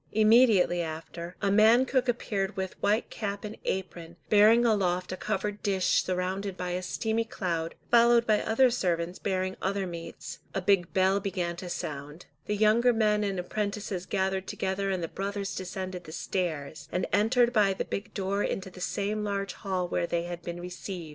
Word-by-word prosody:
Immediately 215 Hz, -5 st, +5 dB
after, 170 Hz, +2 st, -6 dB
a 200 Hz, -, +2 dB
man 220 Hz, +5 st, +6 dB
cook 260 Hz, -1 st, +1 dB
appeared 200 Hz, -5 st, -1 dB
with 190 Hz, -1 st, -3 dB
white 215 Hz, +3 st, +1 dB
cap 205 Hz, -1 st, -4 dB
and 210 Hz, +1 st, -6 dB
apron, 170 Hz, -3 st, -4 dB
bearing 220 Hz, +3 st, +6 dB
aloft 185 Hz, -5 st, +1 dB
a -, -, -2 dB
covered 210 Hz, +1 st, -3 dB
dish 190 Hz, -2 st, +2 dB
surrounded 185 Hz, +1 st, -2 dB
by 180 Hz, 0 st, -3 dB
a 180 Hz, +1 st, -2 dB
steamy 220 Hz, +4 st, -1 dB
cloud, 170 Hz, -7 st, -3 dB, 0.2 s
followed 235 Hz, 0 st, +6 dB
by 215 Hz, -2 st, +3 dB
other 245 Hz, +3 st, +3 dB
servants 175 Hz, -5 st, -1 dB
bearing 185 Hz, -1 st, -1 dB
other 195 Hz, 0 st, -1 dB
meats; 170 Hz, -2 st, -7 dB, 0.2 s
a -, -, +1 dB
big 185 Hz, -2 st, +2 dB
bell 190 Hz, +1 st, +3 dB
began 185 Hz, -3 st, -2 dB
to 180 Hz, 0 st, -6 dB
sound, 150 Hz, 0 st, -6 dB, 0.2 s
the 210 Hz, -, 0 dB
younger 220 Hz, +4 st, +4 dB
men 210 Hz, -2 st, +2 dB
and 195 Hz, -2 st, -1 dB
apprentices 200 Hz, -1 st, -3 dB
gathered 190 Hz, -1 st, -1 dB
together 195 Hz, +1 st, -2 dB
and 185 Hz, -3 st, -1 dB
the -, -, -1 dB
brothers 200 Hz, +2 st, -4 dB
descended 185 Hz, -1 st, -5 dB
the 155 Hz, -, -9 dB
stairs, 160 Hz, -4 st, -3 dB
and 180 Hz, +1 st, 0 dB
entered 235 Hz, +4 st, +3 dB
by 210 Hz, -4 st, +4 dB
the 190 Hz, -, -2 dB
big 200 Hz, +2 st, -5 dB
door 200 Hz, +1 st, -1 dB
into 190 Hz, -2 st, -2 dB
the 180 Hz, -, -11 dB
same 205 Hz, +4 st, -1 dB
large 200 Hz, -2 st, -2 dB
hall 185 Hz, -2 st, -2 dB
where 170 Hz, -, -1 dB
they 170 Hz, 0 st, -1 dB
had 175 Hz, 0 st, -6 dB
been 175 Hz, 0 st, -6 dB
received. 180 Hz, -1 st, -6 dB
195 Hz, 180 wpm, -28 LUFS, 180-210 Hz, 0.2 s, man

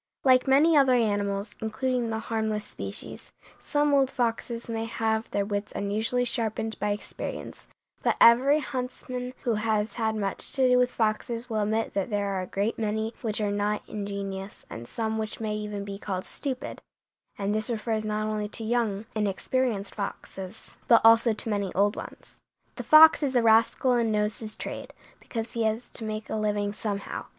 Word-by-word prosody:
Like 255 Hz, 0 st, +5 dB
many 295 Hz, +5 st, +5 dB
other 270 Hz, -3 st, +5 dB
animals, 205 Hz, -2 st, 0 dB
including 235 Hz, +2 st, -1 dB
the 220 Hz, -, -1 dB
harmless 220 Hz, -1 st, -2 dB
species, -, -, -7 dB, 0.3 s
some 295 Hz, 0 st, +1 dB
old 270 Hz, -2 st, +4 dB
foxes 235 Hz, -1 st, -2 dB
may 225 Hz, -1 st, -2 dB
have 225 Hz, -1 st, -1 dB
their 200 Hz, 0 st, 0 dB
wits 205 Hz, 0 st, -3 dB
unusually 220 Hz, +5 st, 0 dB
sharpened 225 Hz, -2 st, -2 dB
by 210 Hz, +1 st, 0 dB
experience, 205 Hz, 0 st, -5 dB, 0.3 s
but -, -, +2 dB
every 260 Hz, +5 st, +7 dB
huntsman 250 Hz, -1 st, -5 dB
who 235 Hz, -, +1 dB
has 215 Hz, -1 st, 0 dB
had 220 Hz, 0 st, +1 dB
much 200 Hz, -3 st, -3 dB
to 265 Hz, -2 st, +3 dB
do 250 Hz, 0 st, +5 dB
with 250 Hz, 0 st, +3 dB
foxes 230 Hz, +1 st, -1 dB
will 215 Hz, -1 st, +1 dB
admit 220 Hz, +2 st, 0 dB
that 195 Hz, +3 st, -1 dB
there 205 Hz, -2 st, 0 dB
are 190 Hz, -1 st, -1 dB
a 185 Hz, -, -5 dB
great 205 Hz, +6 st, -1 dB
many 220 Hz, +1 st, -1 dB
which 220 Hz, -3 st, -1 dB
are 205 Hz, -1 st, 0 dB
not 205 Hz, +1 st, -1 dB
ingenious, 200 Hz, -1 st, -5 dB
and 120 Hz, +1 st, -7 dB
some 220 Hz, -1 st, -2 dB
which 215 Hz, -1 st, -4 dB
may 215 Hz, -1 st, -2 dB
even 210 Hz, -1 st, -4 dB
be 200 Hz, -1 st, -6 dB
called 190 Hz, -2 st, -4 dB
stupid, 265 Hz, -3 st, -4 dB, 0.6 s
and 200 Hz, 0 st, -1 dB
this 215 Hz, +1 st, 0 dB
refers 220 Hz, -1 st, -1 dB
not 215 Hz, 0 st, -1 dB
only 215 Hz, -1 st, -2 dB
to 220 Hz, +2 st, -6 dB
young, 220 Hz, -3 st, 0 dB
inexperienced 210 Hz, +1 st, -1 dB
foxes, 195 Hz, 0 st, -7 dB
but 230 Hz, -, +7 dB
also 230 Hz, +1 st, +6 dB
to 220 Hz, -, -2 dB
many 200 Hz, -3 st, -1 dB
old 205 Hz, +2 st, +3 dB
ones. -, -, -10 dB, 0.4 s
The -, -, -5 dB
fox 315 Hz, +1 st, +8 dB
is 270 Hz, -3 st, 0 dB
a 240 Hz, -, +4 dB
rascal 225 Hz, +3 st, +4 dB
and 235 Hz, -2 st, +2 dB
knows 210 Hz, 0 st, 0 dB
his 215 Hz, -1 st, -6 dB
trade, -, -, -6 dB, 0.3 s
because 225 Hz, -1 st, -5 dB
he 230 Hz, -, -3 dB
has 220 Hz, +2 st, -2 dB
to -, -, -5 dB
make 215 Hz, -1 st, -4 dB
a -, -, -2 dB
living 205 Hz, -1 st, 0 dB
somehow. 205 Hz, -2 st, -4 dB
220 Hz, 180 wpm, -27 LUFS, 205-235 Hz, 0.6 s, fox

